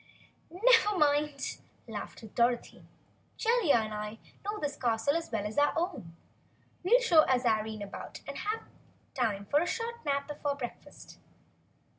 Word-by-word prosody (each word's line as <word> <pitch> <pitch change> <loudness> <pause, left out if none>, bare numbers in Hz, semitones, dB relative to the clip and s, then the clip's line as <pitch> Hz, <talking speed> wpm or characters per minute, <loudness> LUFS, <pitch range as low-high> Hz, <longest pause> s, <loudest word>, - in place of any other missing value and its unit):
"Never 420 +2 +4
mind," 290 -2 +1 0.3
laughed 220 0 -7
Dorothy. 240 0 0 0.5
"Jellia 460 -9 +3
and 220 -2 0
I 210 +1 -5 0.3
know 415 +1 -3
this 290 -1 -2
castle 235 +4 +1
as 330 -3 -3
well 215 -3 -1
as 215 +7 -1
our 290 - +4
own. 280 - -3 0.7
We'll 470 +8 +5
show 340 -10 +6
Azarine 220 -4 +1
about 200 - -8
and 280 - -5
have 430 +2 -2 0.5
time 215 -6 -1
for 285 +8 +3
a 350 - 0
short 470 0 -3
nap 280 -1 0
before 290 -1 -2
breakfast." 250 -4 -9
285 Hz, 140 wpm, -31 LUFS, 225-350 Hz, 0.7 s, show